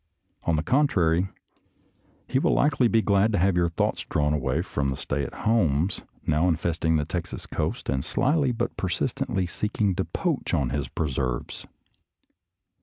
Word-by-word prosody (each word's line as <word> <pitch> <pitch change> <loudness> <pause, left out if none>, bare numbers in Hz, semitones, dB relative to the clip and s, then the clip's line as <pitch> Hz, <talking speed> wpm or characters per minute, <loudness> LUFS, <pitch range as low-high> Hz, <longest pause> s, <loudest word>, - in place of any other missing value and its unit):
On 85 - +2
the 75 - 0
contrary, 95 - +2 1.0
he 130 - +1
will - - +2
likely 135 -4 +3
be 115 -1 +2
glad 100 +2 +3
to - - +2
have 95 +1 +3
your 85 -1 +2
thoughts 85 - 0
drawn 75 0 0
away 70 +2 0
from 70 -7 -1
the 65 - -1
stay 70 -1 -2
at - - -5
homes 90 -6 +2 0.2
now 80 +3 +2
infesting 80 -1 +1
the 75 -1 +1
Texas 85 +2 -4
coast - - -3
and 65 0 0
slyly 140 -1 +1
but 115 - -2
persistently 95 -1 -1
seeking 105 +2 -1
to 95 +1 -1
poach 160 - -1
on 65 -6 0
his 70 0 -2
preserves. 65 -5 -3
85 Hz, 160 wpm, -26 LUFS, 75-105 Hz, 1.0 s, likely